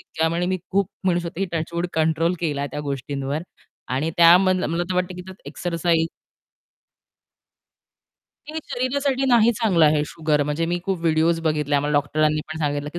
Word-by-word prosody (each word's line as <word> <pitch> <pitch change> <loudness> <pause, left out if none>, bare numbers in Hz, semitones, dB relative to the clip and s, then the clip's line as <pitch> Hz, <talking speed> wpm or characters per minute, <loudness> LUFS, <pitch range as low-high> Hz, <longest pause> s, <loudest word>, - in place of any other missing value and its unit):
इतक्या 160 0 -1
म्हणजे 170 +2 -1
मी 185 0 0
खूप 195 0 +1 0.2
म्हणू 175 -2 +2
शकते 175 +3 -3
की - - -5
टचवूड 170 +2 -2
कंट्रोल 160 +2 +1
केलाय 145 -4 -1
त्या 150 - -4
गोष्टींवर 140 +1 -3 0.5
आणि 135 +5 -1
त्या 170 +1 +8
मन 185 -1 +2
मला 170 +2 -1
तर - - 0
वाटतं 180 0 -1
की 190 +1 -10
एक्सरसाइज 165 +1 0 2.4
हे 315 +1 -4
शरीरासाठी 270 +2 -1
नाही 235 -1 +5
चांगलं 210 -8 +2
आहे 150 -1 +4
शुगर, 155 -2 0
म्हणजे 150 +3 -1
मी 175 +1 -1
खूप 190 -2 -1
व्हिडिओज 165 0 +2
बघितल्या 150 -2 0
आम्हाला 145 +1 -1
डॉक्टरांनी 150 +1 +1
पण 160 - -6
सांगितलं 145 -1 -2
की 175 - -5
165 Hz, 165 wpm, -22 LUFS, 150-180 Hz, 2.4 s, त्या